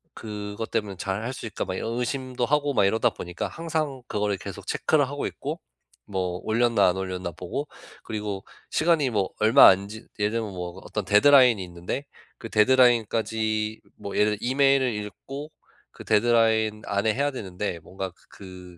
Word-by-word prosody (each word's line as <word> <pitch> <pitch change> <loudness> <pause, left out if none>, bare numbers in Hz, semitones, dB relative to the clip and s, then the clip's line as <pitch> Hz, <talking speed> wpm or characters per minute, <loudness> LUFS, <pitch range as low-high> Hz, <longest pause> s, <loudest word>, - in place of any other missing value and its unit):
그것 105 0 -6
때문에 105 -5 -2
'잘할 100 +7 -3
수 125 - -8
있을까?' 105 - -4
막 95 - -4
이런 115 +5 -3
의심도 130 0 -2
하고 145 0 +1
막 - - +3
이러다 110 +3 +2
보니까 90 0 -5
항상 155 -5 -3
그거를 105 -1 0
계속 - - -9
체크를 145 -4 +2
하고 145 0 -4
있고 - - -5 0.5
뭐 90 -2 -3
올렸나 115 -3 +3
안 90 - -1
올렸나 90 -2 -4
보고 95 - -5 0.4
그리고 105 -3 -4 0.3
시간이 155 -5 +2
뭐 100 -3 0
얼마 110 +6 +8
안 95 +1 +2
지 110 +1 -10
예를 105 +1 +1
들면 110 -3 -2
뭐 90 +1 -6
어떤 105 -3 -4
데드라인이 120 -1 +6
있는데 90 +10 -5 0.3
그 115 - -8
데드라인까지 110 -2 +2 0.2
뭐 100 - -6
예를 105 0 +4
들어 120 - -3
이메일을 135 -2 +3
읽고 135 +8 -7 0.4
그 - - -12
데드라인 110 -1 +3
안에 100 +2 +1
해야 145 +1 +1
되는데 95 -6 -4
뭔가 95 +3 -6 0.2
그 90 -2 -12
110 Hz, 350 characters per minute, -25 LUFS, 100-125 Hz, 0.5 s, 얼마